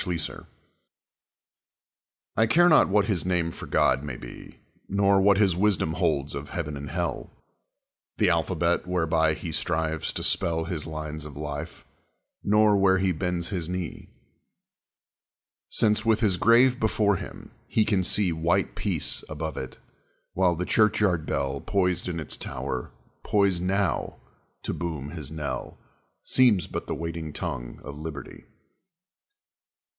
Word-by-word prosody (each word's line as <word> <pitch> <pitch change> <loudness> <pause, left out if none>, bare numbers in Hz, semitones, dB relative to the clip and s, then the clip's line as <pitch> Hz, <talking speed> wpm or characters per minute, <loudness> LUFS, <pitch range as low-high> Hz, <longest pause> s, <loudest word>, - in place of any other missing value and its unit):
An - - -6
Invalid 85 -2 -3 1.9
I 110 +1 +3
care 175 +9 +5
not 160 - +6
what 100 +1 +3
his 100 -7 0
name 90 -2 0
for - - -9
God 75 -3 +2
may 70 -5 -5
be, - - -11 0.3
Nor 100 0 +3
what 100 0 +5
his 100 -4 +3
wisdom 95 -5 +1
holds 75 -3 0
of 70 +1 -6
heaven 75 0 -4
and 70 0 -7
hell, 85 +3 -3 0.9
The - - +3
alphabet 85 0 +1
whereby 80 -3 +1
he 80 - -6
strives 80 0 -1
to - - -3
spell 80 -1 +2
His 80 -3 -3
lines 75 -1 -5
of 75 -2 -9
life, 75 +2 -6 0.6
nor 105 0 +4
where 95 -1 +4
he 95 0 +1
bends 90 0 -1
his 90 -5 -2
knee, 90 -3 -5 1.6
Since, 105 -1 +3
with 115 0 +2
his 100 -5 +3
grave 125 +5 +5
before 105 -3 +2
him, - - -9 0.2
he 110 - +2
can 100 -4 +1
see 95 0 +2
White 85 +4 0
Peace - - 0
above 75 0 -4
it, 65 - -6 0.6
while 90 -2 +2
the 90 +2 -3
churchyard 105 -7 +2
bell 70 0 -2
Poised 90 -3 0
in 85 -2 -3
its 75 - -2
tower, 65 - -4 0.3
poised 100 -4 +2
now, 95 -2 -1 0.5
to - - -2
boom 75 -5 -4
his 75 -5 -6
knell, 70 -5 -5 0.5
Seems 115 -10 +4
but - - -6
the - - -2
waiting 80 -1 -5
tongue 70 -10 -5
of 70 +1 -8
liberty. 75 -2 -8
85 Hz, 145 wpm, -26 LUFS, 75-100 Hz, 1.9 s, not